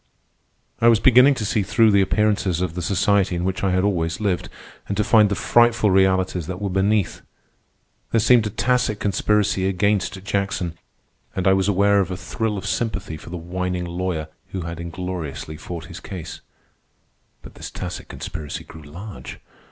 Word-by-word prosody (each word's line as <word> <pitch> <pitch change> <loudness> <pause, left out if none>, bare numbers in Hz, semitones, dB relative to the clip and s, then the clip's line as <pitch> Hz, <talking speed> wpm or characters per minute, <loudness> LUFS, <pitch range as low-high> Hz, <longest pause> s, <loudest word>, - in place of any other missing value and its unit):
I 115 - +4
was 115 -2 +6
beginning 130 +3 +6
to 110 - -3
see 105 +1 +1
through 110 +3 +3
the 100 -1 +5
appearances 100 -3 +1
of 90 -2 -2
the 90 - -4
society 95 +1 +2
in 85 - -2
which 95 +1 -2
I 95 - +2
had 95 0 +1
always 85 -4 0
lived, 100 -5 -1 0.4
and 100 - -3
to 105 - +2
find 105 -1 +5
the 100 - 0
frightful 120 -2 +3
realities 95 -3 +2
that 95 -1 -5
were 100 -2 -3
beneath. 100 +1 +1 0.9
There 115 - +2
seemed 115 0 +4
a - - -3
tacit 120 -1 0
conspiracy 100 -1 +1
against 95 0 0
Jackson, 100 -4 -2 0.6
and 95 0 0
I 95 - +6
was 95 0 +1
aware 100 0 +3
of 95 - 0
a 90 - -4
thrill 110 +2 -3
of 95 - -6
sympathy 110 -8 -2
for 80 - -11
the 90 - -5
whining 90 +1 -3
lawyer 85 -2 -3 0.2
who 95 - -3
had 85 0 -6
ingloriously 85 -3 -5
fought 85 +1 -7
his - - -9
case. 90 -4 -8 1.0
But - - -12
this - - -8
tacit - - -6
conspiracy 75 -4 -6
grew 80 - -12
large. 90 +8 -9
95 Hz, 175 wpm, -22 LUFS, 90-105 Hz, 1.0 s, was